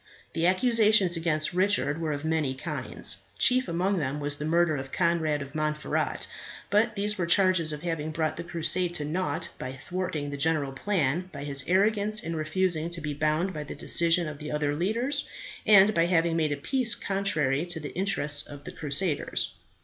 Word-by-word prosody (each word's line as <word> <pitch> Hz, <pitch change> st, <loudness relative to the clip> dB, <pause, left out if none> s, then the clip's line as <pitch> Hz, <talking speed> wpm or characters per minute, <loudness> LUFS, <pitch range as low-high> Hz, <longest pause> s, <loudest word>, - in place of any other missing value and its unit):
The 165 Hz, +1 st, +2 dB
accusations 210 Hz, -3 st, +4 dB
against 160 Hz, -2 st, 0 dB
Richard 180 Hz, -5 st, +1 dB
were 160 Hz, -2 st, -1 dB
of 145 Hz, +1 st, -4 dB
many 155 Hz, -4 st, 0 dB
kinds. 130 Hz, -, -3 dB, 0.2 s
Chief 255 Hz, 0 st, +4 dB
among 185 Hz, +3 st, 0 dB
them 145 Hz, -1 st, -2 dB
was 145 Hz, 0 st, -1 dB
the 150 Hz, -, -4 dB
murder 165 Hz, 0 st, +2 dB
of 135 Hz, -1 st, -6 dB
Conrad 160 Hz, -4 st, +1 dB
of 140 Hz, 0 st, -12 dB
Montferat; 155 Hz, 0 st, -2 dB, 0.5 s
but 215 Hz, +2 st, +2 dB
there 200 Hz, 0 st, -1 dB
were 170 Hz, -, 0 dB
charges 185 Hz, -3 st, +3 dB
of 150 Hz, +1 st, -6 dB
having 165 Hz, -3 st, -2 dB
brought 155 Hz, 0 st, -1 dB
the 170 Hz, -, -5 dB
crusade 175 Hz, +1 st, 0 dB
to 150 Hz, -, -2 dB
naught 155 Hz, -1 st, -2 dB
by 130 Hz, +1 st, -5 dB
thwarting 150 Hz, 0 st, -4 dB
the 140 Hz, -, -4 dB
general 145 Hz, -1 st, +1 dB
plans, 165 Hz, +1 st, 0 dB
by 140 Hz, -, -7 dB
his 140 Hz, -2 st, +1 dB
arrogance 210 Hz, +3 st, +2 dB
in 165 Hz, +1 st, -3 dB
refusing 160 Hz, +1 st, 0 dB
to 170 Hz, 0 st, -5 dB
be 150 Hz, -1 st, -4 dB
bound 155 Hz, +6 st, 0 dB
by 150 Hz, -2 st, -5 dB
the 150 Hz, -, -8 dB
decision 170 Hz, 0 st, +2 dB
of 150 Hz, -1 st, -7 dB
the 150 Hz, 0 st, -6 dB
other 150 Hz, -1 st, 0 dB
leaders, 235 Hz, -, -1 dB, 0.4 s
and 205 Hz, 0 st, +7 dB
by 170 Hz, -2 st, +2 dB
having 165 Hz, -2 st, +2 dB
made 155 Hz, -2 st, +1 dB
a 145 Hz, -, -1 dB
peace 245 Hz, -, +2 dB
contrary 165 Hz, -8 st, 0 dB
to 175 Hz, -2 st, -3 dB
the 145 Hz, -2 st, -7 dB
interests 150 Hz, -6 st, +1 dB
of 145 Hz, 0 st, -10 dB
the 180 Hz, -, -7 dB
crusaders. 150 Hz, +2 st, -1 dB
165 Hz, 190 wpm, -27 LUFS, 150-185 Hz, 0.5 s, and